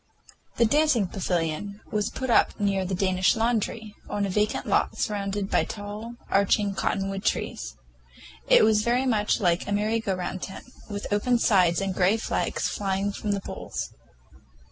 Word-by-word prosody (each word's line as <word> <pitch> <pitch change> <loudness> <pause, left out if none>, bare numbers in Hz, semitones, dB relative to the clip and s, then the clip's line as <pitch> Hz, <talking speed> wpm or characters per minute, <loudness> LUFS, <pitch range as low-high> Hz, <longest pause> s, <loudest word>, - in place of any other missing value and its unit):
The 235 - +5
dancing 290 -3 +3
pavilion 180 +1 -2
was 210 -1 0
put 260 -2 -3
up - - +3
near 195 -2 +1
the 190 +1 -2
Danish 185 -1 +2
laundry, 225 -1 -1 0.2
on 205 -1 -1
a 195 - -2
vacant 210 +2 0
lot - - +1
surrounded 200 -1 -2
by - - +3
tall, 210 +2 -7
arched 200 +2 +3 0.2
cottonwood 195 +1 -1
trees. - - -2 0.7
It - - +7
was 215 -1 +4
very 245 +4 +1
much 215 -4 +1
like 175 -4 +1
a - - -3
merry 215 +3 +1
go 200 -4 -1
round 185 0 -4
tent, 190 - -7 0.2
with 205 -1 -5
open 240 +4 +2
sides 185 -6 +3
and 195 -1 -2
gay 190 +4 +3
flags 225 - -1
flying 195 0 -1
from 205 +1 -2
the 200 - -2
poles. - - -6
205 Hz, 165 wpm, -26 LUFS, 190-220 Hz, 0.7 s, It